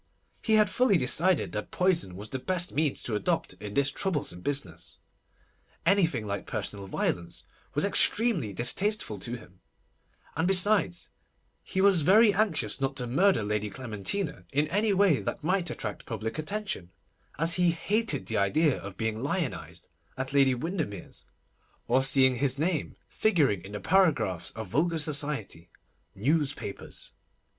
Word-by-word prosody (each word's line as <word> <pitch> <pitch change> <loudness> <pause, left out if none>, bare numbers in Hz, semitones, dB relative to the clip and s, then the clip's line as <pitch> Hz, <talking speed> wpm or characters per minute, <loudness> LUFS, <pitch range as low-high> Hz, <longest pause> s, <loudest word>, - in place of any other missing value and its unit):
He 220 - +2
had 215 -1 +5
fully 210 0 +3
decided 165 +7 +3
that - - -5
poison 175 - 0
was 105 +3 -8
the 130 - -4
best 180 +4 -2
means 150 -1 0
to 115 - -4
adopt 105 - -1
in 105 -1 -8
this 140 -1 +2
troublesome 145 - -2
business. 90 - -4 0.9
Anything 170 - +2
like 100 -1 -4
personal 100 -1 -5
violence 85 -2 -3 0.3
was 150 - +1
extremely 200 - +3
distasteful 125 - 0
to 120 +5 -5
him, 95 -5 -17 0.8
and 160 +3 0
besides, 190 -1 +3 0.5
he 190 - -2
was 195 -4 +4
very 205 +7 +5
anxious 160 - 0
not 135 0 -1
to 125 - -2
murder 175 - +2
Lady 105 0 -2
Clementina 130 - -3
in 145 +2 +1
any 210 +4 +1
way 190 -7 +3
that - - -5
might 180 +1 0
attract - - -6
public 115 +5 -4
attention, 195 - -3 0.5
as 165 +3 +3
he 180 0 +3
hated 175 - 0
the 110 - -2
idea 145 +9 +2
of 100 -1 -9
being 110 0 -2
lionised 145 +1 -3 0.3
at 130 +1 -4
Lady 135 -2 +4
Windermere's, 155 - -5 0.6
or 130 +3 +3
seeing 130 -1 +3
his 135 +1 0
name 160 0 -1
figuring 145 - +1
in 100 - -10
the 105 - -4
paragraphs 160 - +1
of 110 -4 -7
vulgar 165 - +1
society—newspapers. 140 - -2
145 Hz, 145 wpm, -28 LUFS, 110-185 Hz, 0.9 s, had